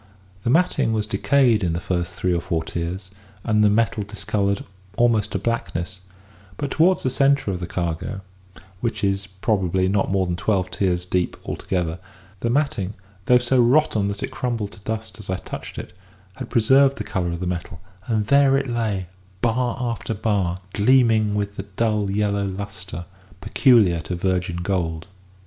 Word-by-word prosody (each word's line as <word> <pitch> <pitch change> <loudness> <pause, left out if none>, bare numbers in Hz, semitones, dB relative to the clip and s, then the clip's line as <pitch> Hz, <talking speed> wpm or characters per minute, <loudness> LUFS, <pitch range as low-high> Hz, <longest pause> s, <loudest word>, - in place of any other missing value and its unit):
The 115 - -1
matting 165 -5 +2
was 110 -1 0
decayed 120 -1 +3
in 85 -2 +1
the 85 - -1
first 90 0 -2
three 90 -1 0
or 85 - 0
four 85 -3 -1
tiers, 90 +3 -5 0.3
and 110 -2 +2
the 105 - +6
metal 110 0 +1
discoloured 100 -1 -1 0.3
almost 115 -3 +2
to - - +1
blackness; 95 -4 -3 0.6
but 140 - -3
towards 180 +4 +3
the 130 - +1
centre 140 -5 +3
of 90 - -3
the 85 - -4
cargo 85 +3 -3 0.6
(which 115 -1 -2
is, 100 0 0
probably, 95 -2 0
not 95 +1 +1
more 95 -1 +2
than 90 -1 -1
twelve 90 -1 0
tiers 90 -2 0
deep 90 0 -1
altogether), 90 -2 -2 0.4
the 115 - -1
matting, 120 -7 0 0.3
though 125 - +6
so 125 +1 +3
rotten 120 -5 +3
that 100 0 -4
it - - -3
crumbled 115 -5 -2
to 105 - -14
dust 110 +2 -5
as 105 - -10
I 95 - +1
touched - - -8
it, - - -7 0.4
had - - -7
preserved 135 +4 +4
the - - -3
colour 90 -2 -2
of 85 - -4
the 90 - -3
metal; 90 0 -4 0.3
and 110 -3 +1
there 140 +2 +5
it 135 0 -1
lay, 110 -6 -1 0.4
bar 120 +1 +1
after 115 -2 -2
bar, 100 -4 0 0.2
gleaming 110 -2 +4
with 100 0 -2
the - - -5
dull 105 -2 +1
yellow 100 0 0
lustre 95 -3 -6 0.3
peculiar 105 - +4
to 80 +3 -4
virgin 90 -1 -1
gold. 85 -4 -1
100 Hz, 170 wpm, -23 LUFS, 90-115 Hz, 0.6 s, the